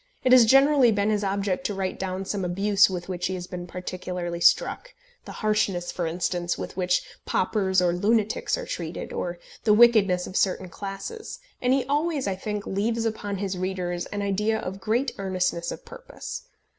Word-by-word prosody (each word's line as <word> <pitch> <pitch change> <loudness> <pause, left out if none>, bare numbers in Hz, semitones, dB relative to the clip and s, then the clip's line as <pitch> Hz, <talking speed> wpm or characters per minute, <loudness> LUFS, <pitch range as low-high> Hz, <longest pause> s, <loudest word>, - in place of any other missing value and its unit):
It 255 - +3
has 250 -2 +8
generally 270 -1 +6
been 205 0 +1
his 210 -1 0
object 195 -2 -1
to 205 - -4
write 190 -1 -3
down 190 0 -3
some 195 0 -2
abuse 195 +3 +3
with 180 -2 -5
which 180 -1 -2
he 190 - -3
has 180 -1 -5
been 180 -1 -7
particularly 180 -1 -5
struck, - - +2 0.3
the - - -8
harshness, 200 -4 +1
for 175 -2 -2
instance, 175 +1 -1
with - - -6
which 180 -1 +1 0.2
paupers 190 -1 +1
or 175 -1 +2
lunatics 215 +4 +1
are - - -5
treated, 170 -1 -5
or 175 -1 -3 0.3
the 210 -2 +5
wickedness 210 -6 +5
of 185 - -9
certain 185 -2 +1
classes, 200 - -6 0.2
and 250 - +2
he 265 -1 +2
always, 295 +1 0
I 195 - 0
think, 210 +1 -4
leaves 225 +4 -1
upon 205 -3 -2
his 190 -1 -3
readers 180 -2 -2
an 205 0 -4
idea 210 +3 +1
of 190 -2 -6
great 235 +7 0
earnestness 185 -3 -1
of - - -8
purpose. - - -8
195 Hz, 180 wpm, -25 LUFS, 180-220 Hz, 0.3 s, has